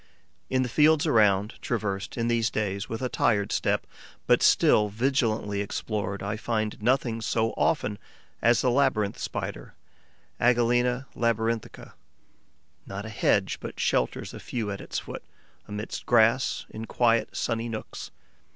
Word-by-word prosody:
In 130 0 +2
the - - -2
fields 150 +4 +4
around, 105 -1 +2
traversed, 100 -4 -3
in 115 0 0
these 115 -1 +2
days, 100 -2 -2
with 115 +3 -4
a - - +1
tired 105 -5 +1
step, - - 0 0.4
but - - +4
still 105 -1 +4
vigilantly 110 -3 0
explored, 100 -1 -3
I 105 +2 -2
find 110 -1 -2
nothing 120 -1 +1
so 110 +1 0
often 105 -9 0 0.4
as 120 +2 +4
the 125 - +2
Labyrinth 120 -6 +1
Spider - - -5 0.6
(Agelena 120 +1 +2
labyrinthica, 115 -1 -1
CLERCK.). - - -28 0.9
Not 100 +1 -6
a - - -6
hedge 105 - +1
but - - -8
shelters 60 - 0
a - - -8
few 110 -4 -4
at 100 - -5
its - - -5
foot, - - -6 0.5
amidst 105 +1 -6
grass, 120 +2 +3
in 110 +1 -6
quiet, 115 -2 +1
sunny 115 0 -1
nooks. 110 -1 -6
115 Hz, 140 wpm, -27 LUFS, 105-120 Hz, 0.9 s, fields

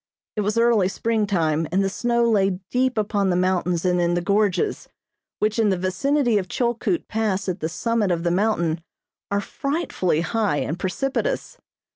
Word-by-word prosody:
It 210 - 0
was 210 +2 -1
early 230 -5 +4
springtime 190 -8 0
and 190 +2 +2
the - - +1
snow 235 +4 +1
lay 195 -4 +2
deep 255 -1 +1
upon 205 -2 +1
the 180 - +2
mountains 180 -1 0
and 180 -1 +2
in 175 0 +1
the 175 - 0
gorges, 200 0 0 0.5
which, 215 +2 0
in 220 -2 +3
the 190 - +1
vicinity 230 +6 +1
of 185 - -5
Chilkoot 240 - -1
Pass 210 -3 -1
at 185 0 -2
the 160 - -2
summit 230 +2 0
of 170 -2 0
the 170 - +1
mountain 175 -4 +1 0.5
are 200 - +1
frightfully 275 - -1
high 210 -4 0
and 160 +4 -2
precipitous. 270 - -2
200 Hz, 170 wpm, -23 LUFS, 180-230 Hz, 0.5 s, early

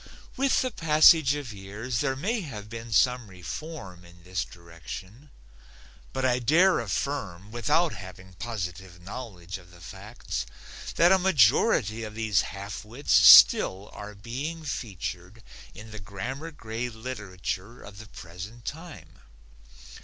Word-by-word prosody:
With 270 0 +2
the 255 - -2
passage 155 - +5
of 140 -6 -6
years 105 +5 -5
there 135 -1 0
may 210 - -1
have 105 - -8
been 115 0 -7
some 125 +2 +3
reform 95 - -8
in 85 0 -17
this 90 0 -2
direction, 90 - -11 0.8
but 130 0 -2
I 125 -1 +2
dare 170 +10 +4
affirm, 105 -4 -3
without 145 +8 +1
having 90 0 -11
positive 90 -3 -6
knowledge 95 -2 -8
of 90 -1 -18
the 85 -1 -17
facts, 65 -5 -6 0.5
that 175 +2 +5
a 190 - +5
majority 120 - +3
of 105 -1 -7
these 110 -5 +2
half 100 +1 -7
wits 120 +7 -3
still 95 +2 +8
are 105 0 -9
being 135 +11 -5
featured 100 - -6 0.3
in 110 +1 -11
the 110 - -8
grammar 120 +11 -6
grade 115 -4 -6
literature 110 -2 -6
of 100 -1 -12
the 110 - -11
present 100 +6 -10
time. 160 +1 -9
110 Hz, 135 wpm, -27 LUFS, 95-135 Hz, 0.8 s, still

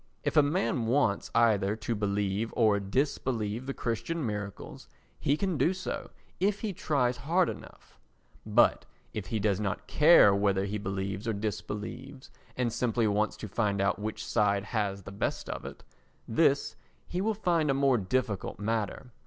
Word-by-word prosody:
If - - -1
a 150 - +8
man 145 - 0
wants 115 -5 +1
either 105 -3 +3
to 115 +1 -3
believe 105 +1 -1
or 110 -3 +4
disbelieve 115 +1 -1
the 135 - -2
Christian 125 +7 -2
miracles 105 - -6 0.3
he 145 - +1
can 185 -4 -1
do 180 +4 +3
so 185 - -5 0.3
if 200 +2 +1
he 215 -3 -2
tries 125 -7 0
hard 165 +7 +2
enough; - - -11 0.4
but - - +3 0.3
if 105 -4 -5
he 110 +3 -1
does 100 -2 +1
not 105 -1 -2
care 150 -10 +6
whether 100 -1 +1
he 105 +1 -3
believes 95 +1 -3
or 115 - +1
disbelieves 110 +6 -5 0.3
and 120 -3 0
simply 120 -2 +1
wants 105 +1 +1
to 110 - -6
find 100 -1 0
out 100 0 +1
which 110 +1 -4
side 100 -3 +2
has 100 -3 -2
the 100 - -9
best 100 - -3
of - - -6
it, - - -9 0.4
this 140 +3 +2 0.3
he 180 - -3
will 220 +2 0
find 170 -7 +1
a 135 - +3
more 135 -3 +3
difficult 105 0 -2
matter. 115 +4 -3
110 Hz, 165 wpm, -29 LUFS, 100-140 Hz, 0.4 s, a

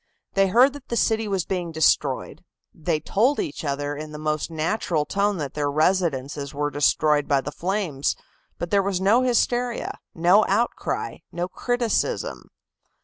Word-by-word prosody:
They 195 0 +3
heard 250 +8 +5
that 285 -2 -11
the 235 - -2
city 220 -1 +1
was 195 -4 -1
being 180 -3 -3
destroyed; 160 -1 +1 0.3
they 160 -1 -1
told 245 - +1
each 145 - -4
other 145 0 -2
in 155 +1 -7
the 150 - -7
most 155 0 -2
natural 160 -1 -1
tone 200 +2 0
that 145 -4 -4
their 145 -1 -1
residences 145 -3 0
were 145 0 -1
destroyed 145 +1 +2
by 140 -2 +2
the 145 - -5
flames, 175 -6 -1 0.4
but 175 - -5
there 200 - +4
was 195 -2 -1
no 205 +6 +4
hysteria, 245 -1 0 0.2
no 180 +5 +5
outcry, 240 - -1
no 175 +1 -2
criticism. 245 +3 -1
175 Hz, 155 wpm, -24 LUFS, 150-210 Hz, 0.4 s, heard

